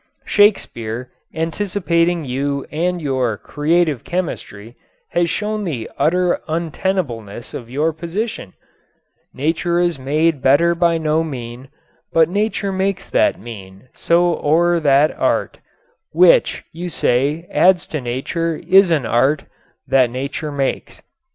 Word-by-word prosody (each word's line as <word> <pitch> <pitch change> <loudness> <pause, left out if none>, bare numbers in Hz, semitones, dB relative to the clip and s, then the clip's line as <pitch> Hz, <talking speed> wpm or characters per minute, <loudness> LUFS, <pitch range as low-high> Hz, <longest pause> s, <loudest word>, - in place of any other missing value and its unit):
Shakespeare, 125 - +1 0.2
anticipating 170 -1 0
you 140 +2 -2
and 175 +3 -1
your 130 -7 -1
"Creative 155 -2 0
Chemistry," 120 - -5 0.4
has 170 -1 +1
shown 210 +3 -2
the 135 - -4
utter 180 +2 +1
untenableness 155 - -3
of 120 - -7
your 150 +5 0
position: 170 - -5 0.8
Nature 165 +4 -1
is 175 -4 0
made 150 +2 +1
better 165 +6 +4
by 170 -1 +2
no 160 0 +1
mean, 125 -3 -7 0.4
But 165 -1 +4
nature 205 +1 -1
makes 190 0 -2
that - - +2
mean: 100 0 -11
so 175 0 +2
o'er 170 +3 +3
that 145 0 +4
art, - - -1 0.5
Which, - - +4
you 175 +2 -6
say, 145 +4 0
adds 180 -1 +4
to 150 - -1
nature, 150 +7 -2
is 190 0 +6
an 155 -7 +1
art 135 +6 +2 0.4
That 130 -2 +3
nature 140 +4 -4
makes. 140 -2 -3
160 Hz, 120 wpm, -19 LUFS, 130-175 Hz, 0.8 s, is